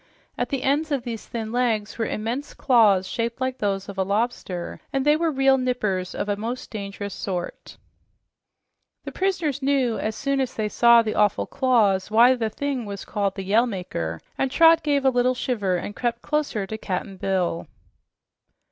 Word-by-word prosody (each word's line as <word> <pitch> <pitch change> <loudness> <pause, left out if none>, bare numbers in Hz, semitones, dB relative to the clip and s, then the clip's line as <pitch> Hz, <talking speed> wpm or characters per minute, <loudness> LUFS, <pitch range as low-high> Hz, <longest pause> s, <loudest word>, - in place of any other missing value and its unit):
At - - -2
the 275 -2 -2
ends 295 +3 +1
of 275 -4 0
these 230 -3 -6
thin 220 -2 -5
legs 230 -4 0
were 225 - 0
immense 235 +7 -4
claws 210 -8 +4
shaped 230 +3 -3
like 260 0 -2
those 195 -2 -1
of 200 -1 -7
a - - +3
lobster, 200 -3 -2
and 270 0 -1
they 295 0 +5
were 330 +1 +1
real 270 -1 +3
"nippers" 210 -8 -1
of - - -3
a 205 - 0
most 230 +5 -5
dangerous 200 -1 -5
sort. 180 -3 -5 1.3
The - - -6
prisoners 340 -8 -1
knew, 265 -4 +1
as 215 0 -2
soon 275 +3 0
as 260 -1 -3
they 215 -1 -1
saw 235 +1 +6
the 215 - -2
awful 210 -1 +2
claws, 210 -8 +2
why 235 +4 +6
the 230 -3 -1
thing 270 +1 -3
was 200 -1 -6
called 200 -2 -1
the 195 - -5
"Yell 225 +6 +3
Maker," 85 - -4 0.2
and 270 - +1
Trot 325 +4 +6
gave 285 -3 0
a 265 - +5
little 250 0 +2
shiver 205 -8 -1
and 205 +4 -4
crept 240 -1 -2
closer 295 -9 -1
to 220 +3 -6
Cap'n 190 0 -4
Bill. 185 -3 -1
230 Hz, 185 wpm, -24 LUFS, 200-265 Hz, 1.3 s, saw